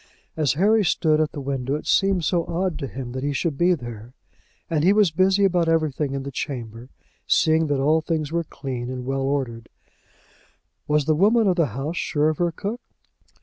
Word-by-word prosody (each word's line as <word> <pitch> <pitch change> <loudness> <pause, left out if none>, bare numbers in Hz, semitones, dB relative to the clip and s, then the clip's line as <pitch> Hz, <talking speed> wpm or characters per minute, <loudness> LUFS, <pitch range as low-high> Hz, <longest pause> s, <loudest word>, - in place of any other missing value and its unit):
As 155 -4 +1
Harry 210 +7 +3
stood 155 -3 +2
at 155 - 0
the - - -7
window 135 0 -2
it 150 - -6
seemed 195 -4 +2
so 175 -2 +1
odd 175 -2 -2
to 140 - -4
him 130 -1 -7
that 130 +1 -5
he 145 0 -1
should 155 +1 -1
be 175 +5 +3
there. 120 -3 -9 0.5
And 155 -2 0
he 190 +4 +5
was 205 -5 +4
busy 190 +4 +3
about 175 -3 +2
everything 150 -3 0
in 135 - -3
the 140 - -6
chamber, 120 -2 -6 0.4
seeing 160 -1 +3
that 145 -2 0
all 155 +4 +3
things 155 -2 -2
were 170 0 0
clean 130 -5 -6
and 125 -1 -5
well 135 +1 -2
ordered. 130 -4 -2 1.2
Was 150 -1 +2
the 155 - +3
woman 215 +8 +3
of 185 - +3
the 165 -4 +2
house 150 +5 -3
sure 150 0 +1
of 155 - -3
her 175 -1 +1
cook? 210 +8 -5
155 Hz, 200 wpm, -23 LUFS, 135-175 Hz, 1.2 s, he